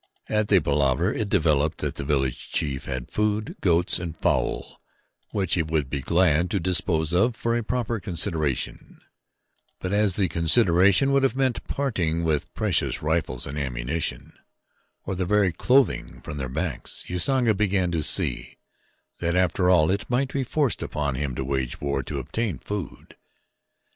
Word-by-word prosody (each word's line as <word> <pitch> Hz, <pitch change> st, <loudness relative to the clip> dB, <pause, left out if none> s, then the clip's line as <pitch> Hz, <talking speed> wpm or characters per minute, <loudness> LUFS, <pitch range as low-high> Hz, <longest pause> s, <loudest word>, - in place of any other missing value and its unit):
At 105 Hz, -1 st, +1 dB
the 100 Hz, -3 st, +5 dB
palaver 75 Hz, +2 st, +1 dB
it 110 Hz, -2 st, -3 dB
developed 75 Hz, -5 st, +1 dB
that -, -, -3 dB
the -, -, -6 dB
village 70 Hz, -3 st, -2 dB
chief 70 Hz, -3 st, -1 dB
had 65 Hz, -2 st, -5 dB
food, 105 Hz, 0 st, -1 dB
goats, 85 Hz, -1 st, +2 dB
and 85 Hz, -2 st, -6 dB
fowl -, -, -1 dB, 0.5 s
which 95 Hz, -4 st, -1 dB
he 85 Hz, -, +2 dB
would 80 Hz, -4 st, -2 dB
be 70 Hz, -, -2 dB
glad 85 Hz, +1 st, +2 dB
to 100 Hz, -, 0 dB
dispose 85 Hz, -2 st, +2 dB
of 115 Hz, +7 st, +2 dB
for 115 Hz, 0 st, -1 dB
a 120 Hz, -, 0 dB
proper 120 Hz, 0 st, -2 dB
consideration; 80 Hz, -8 st, -1 dB, 0.8 s
but 90 Hz, +1 st, -4 dB
as 105 Hz, -2 st, +2 dB
the 95 Hz, 0 st, +1 dB
consideration 90 Hz, -, +4 dB
would 140 Hz, 0 st, +3 dB
have 135 Hz, -1 st, +1 dB
meant 130 Hz, -2 st, 0 dB
parting 85 Hz, -, -1 dB
with 80 Hz, -3 st, -1 dB
precious -, -, 0 dB
rifles 75 Hz, -6 st, -1 dB
and 70 Hz, +2 st, -5 dB
ammunition, 65 Hz, +3 st, -3 dB, 0.7 s
or -, -, -4 dB
the 95 Hz, 0 st, -2 dB
very 100 Hz, 0 st, +2 dB
clothing 130 Hz, +9 st, +1 dB
from 75 Hz, -, -7 dB
their 65 Hz, -2 st, -3 dB
backs, 65 Hz, -, -3 dB
Usanga 120 Hz, +6 st, +3 dB
began 95 Hz, -3 st, 0 dB
to 85 Hz, -2 st, -1 dB
see -, -, +2 dB, 0.6 s
that 85 Hz, 0 st, -1 dB
after 90 Hz, 0 st, +2 dB
all 85 Hz, -2 st, +4 dB
it 100 Hz, +2 st, -3 dB
might 130 Hz, +2 st, 0 dB
be 135 Hz, -, 0 dB
forced 140 Hz, 0 st, 0 dB
upon 75 Hz, -2 st, -2 dB
him 65 Hz, -1 st, -3 dB
to 65 Hz, -, -3 dB
wage 65 Hz, -2 st, -2 dB
war 70 Hz, -1 st, -1 dB
to -, -, -6 dB
obtain 110 Hz, -, -3 dB
food. 100 Hz, +6 st, -7 dB
85 Hz, 165 wpm, -24 LUFS, 75-105 Hz, 0.8 s, the